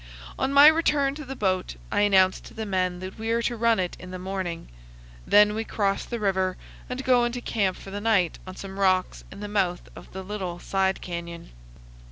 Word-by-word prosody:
On 265 Hz, -, 0 dB
my 280 Hz, +1 st, +8 dB
return 300 Hz, -3 st, +4 dB
to 305 Hz, +1 st, -8 dB
the 270 Hz, +1 st, -6 dB
boat 185 Hz, -5 st, -1 dB, 0.2 s
I 205 Hz, -, +2 dB
announce 190 Hz, -2 st, +4 dB
to -, -, -14 dB
the 220 Hz, -, -4 dB
men 185 Hz, -2 st, -1 dB
that 185 Hz, +3 st, -8 dB
we 225 Hz, +1 st, -3 dB
are 230 Hz, +1 st, +1 dB
to 240 Hz, -, -1 dB
run 230 Hz, -2 st, +2 dB
it 180 Hz, -1 st, -2 dB
in 180 Hz, -, -10 dB
the 185 Hz, -, -6 dB
morning. 185 Hz, -2 st, -4 dB, 0.6 s
Then 210 Hz, 0 st, +6 dB
we 220 Hz, +1 st, -2 dB
cross 200 Hz, -3 st, -1 dB
the 235 Hz, -, -4 dB
river 190 Hz, -2 st, 0 dB, 0.3 s
and 250 Hz, +1 st, -4 dB
go 250 Hz, -2 st, +4 dB
into 240 Hz, +1 st, -1 dB
camp 200 Hz, -6 st, -1 dB
for 195 Hz, -, -11 dB
the 205 Hz, +1 st, -5 dB
night 205 Hz, -6 st, +2 dB
on 185 Hz, -, -8 dB
some 195 Hz, 0 st, -8 dB
rocks 185 Hz, -1 st, +1 dB
in 200 Hz, -, -10 dB
the 205 Hz, -, -4 dB
mouth 190 Hz, -4 st, -1 dB
of -, -, -12 dB
the 190 Hz, 0 st, -7 dB
little 185 Hz, -3 st, -5 dB
side 190 Hz, +1 st, 0 dB
canyon. 170 Hz, -, -7 dB
195 Hz, 215 wpm, -25 LUFS, 185-225 Hz, 0.6 s, my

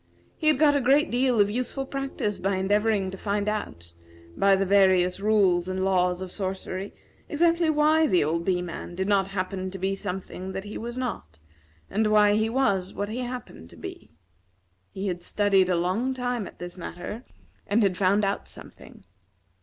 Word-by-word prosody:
He 310 Hz, -, -2 dB
had 310 Hz, -, +5 dB
got 295 Hz, 0 st, +4 dB
a 285 Hz, -, +2 dB
great 280 Hz, +5 st, +3 dB
deal 250 Hz, -1 st, +2 dB
of 205 Hz, 0 st, +4 dB
useful 255 Hz, +4 st, -2 dB
practice 270 Hz, -7 st, -3 dB
by 195 Hz, +1 st, 0 dB
endeavoring 200 Hz, 0 st, +1 dB
to 190 Hz, -, -9 dB
find 205 Hz, 0 st, -1 dB
out, 85 Hz, -, -4 dB, 0.4 s
by 195 Hz, 0 st, +4 dB
the 195 Hz, 0 st, 0 dB
various 185 Hz, -2 st, +4 dB
rules 195 Hz, -4 st, +2 dB
and 185 Hz, 0 st, -1 dB
laws 180 Hz, -1 st, +1 dB
of 185 Hz, -, -7 dB
sorcery, 190 Hz, 0 st, -4 dB, 0.4 s
exactly 335 Hz, +1 st, +2 dB
why 310 Hz, +1 st, +4 dB
the 180 Hz, -, +3 dB
old 165 Hz, +3 st, -1 dB
Bee 180 Hz, -1 st, 0 dB
man 175 Hz, 0 st, -7 dB
did 190 Hz, +2 st, -2 dB
not 200 Hz, -2 st, +2 dB
happen 190 Hz, -1 st, -3 dB
to 190 Hz, -, -7 dB
be 190 Hz, +1 st, -1 dB
something 190 Hz, -1 st, -5 dB
that 190 Hz, -, -4 dB
he 205 Hz, +1 st, -8 dB
was 235 Hz, +2 st, -5 dB
not, 155 Hz, -, -5 dB, 0.5 s
and 215 Hz, +1 st, 0 dB
why 210 Hz, -1 st, +5 dB
he 220 Hz, +1 st, +1 dB
was 200 Hz, -7 st, 0 dB
what 205 Hz, +1 st, -3 dB
he 230 Hz, +3 st, -4 dB
happened 245 Hz, -, -7 dB
to -, -, -15 dB
be. -, -, -9 dB, 0.8 s
He 195 Hz, -, -6 dB
had 175 Hz, -3 st, -2 dB
studied 195 Hz, -1 st, +2 dB
a 180 Hz, -, +2 dB
long 205 Hz, +10 st, 0 dB
time 245 Hz, -4 st, -2 dB
at -, -, -13 dB
this 175 Hz, +1 st, -8 dB
matter, 180 Hz, +6 st, -7 dB, 0.4 s
and 215 Hz, +2 st, +2 dB
had 195 Hz, -2 st, +2 dB
found 200 Hz, +2 st, +2 dB
out 195 Hz, +1 st, -2 dB
something. -, -, -13 dB
200 Hz, 185 wpm, -26 LUFS, 185-235 Hz, 0.8 s, had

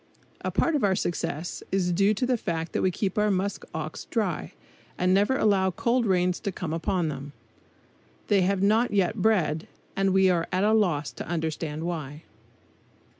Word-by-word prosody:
A -, -, 0 dB
part 330 Hz, -, +1 dB
of 285 Hz, -, 0 dB
our 195 Hz, -2 st, +3 dB
success 170 Hz, -2 st, -3 dB
is 185 Hz, -2 st, +1 dB
due 200 Hz, +4 st, +3 dB
to 250 Hz, -, 0 dB
the 250 Hz, 0 st, +2 dB
fact 165 Hz, -7 st, -3 dB
that -, -, -1 dB
we 185 Hz, -, +3 dB
keep 190 Hz, +2 st, -2 dB
our 210 Hz, 0 st, +3 dB
musk 195 Hz, +1 st, -1 dB
ox -, -, -5 dB
dry, -, -, -2 dB, 0.4 s
and 185 Hz, +1 st, +2 dB
never 205 Hz, +7 st, +3 dB
allow 195 Hz, -5 st, +3 dB
cold 235 Hz, +5 st, 0 dB
rains 180 Hz, -1 st, +2 dB
to 200 Hz, -, -3 dB
come 170 Hz, -3 st, -4 dB
upon 165 Hz, +1 st, 0 dB
them. 140 Hz, 0 st, -7 dB, 0.9 s
They 200 Hz, -2 st, +3 dB
have 190 Hz, +1 st, +1 dB
not 220 Hz, +4 st, +3 dB
yet 195 Hz, -4 st, +1 dB
bred; 175 Hz, -8 st, +1 dB, 0.3 s
and 195 Hz, 0 st, +2 dB
we 190 Hz, 0 st, +4 dB
are 170 Hz, -2 st, 0 dB
at 185 Hz, +1 st, +1 dB
a 215 Hz, +1 st, +3 dB
loss 175 Hz, -10 st, +1 dB
to -, -, -8 dB
understand 160 Hz, -2 st, -3 dB
why. 155 Hz, -3 st, -5 dB
185 Hz, 180 wpm, -26 LUFS, 165-205 Hz, 0.9 s, we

